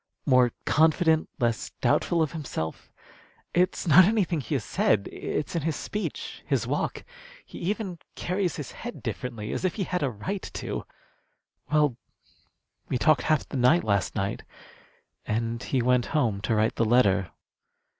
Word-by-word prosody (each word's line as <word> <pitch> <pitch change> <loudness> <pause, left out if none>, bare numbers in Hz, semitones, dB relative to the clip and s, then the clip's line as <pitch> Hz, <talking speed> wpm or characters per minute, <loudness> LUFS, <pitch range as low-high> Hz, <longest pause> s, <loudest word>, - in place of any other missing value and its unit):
"More 125 -3 +5
confident, 160 +1 +3
less 120 -4 0
doubtful 170 -2 +2
of 155 - -2
himself. 130 - -5 0.6
It's 180 +2 +1
not 170 +4 +9
anything 185 -6 +1
he 145 - -3
has 130 - -1
said. 100 0 +1
It's 150 - -3
in 165 - +1
his 155 +1 -1
speech, 210 - -5
his - - 0
walk. - - -2 0.4
He - - -10
even 190 -1 -3 0.2
carries 180 -1 -1
his 150 - -6
head 240 +1 -8
differently, 115 -5 -4
as - - -3
if 185 -3 0
he 200 - -1
had 180 0 -2
a 140 - +1
right 185 - -4
to. - - -4 0.9
Well, 150 -5 +3 0.9
we - - +1
talked 150 0 +4
half 155 -3 +1
the - - -4
night 130 +8 +4
last 100 -3 0
night, 100 +1 -2 0.9
and 115 +2 -1
he 130 -2 0
went 125 0 +3
home 110 -9 +1
to 110 - 0
write 110 +1 +1
the - - +3
letter. 100 -6 +3
145 Hz, 155 wpm, -27 LUFS, 115-170 Hz, 0.9 s, not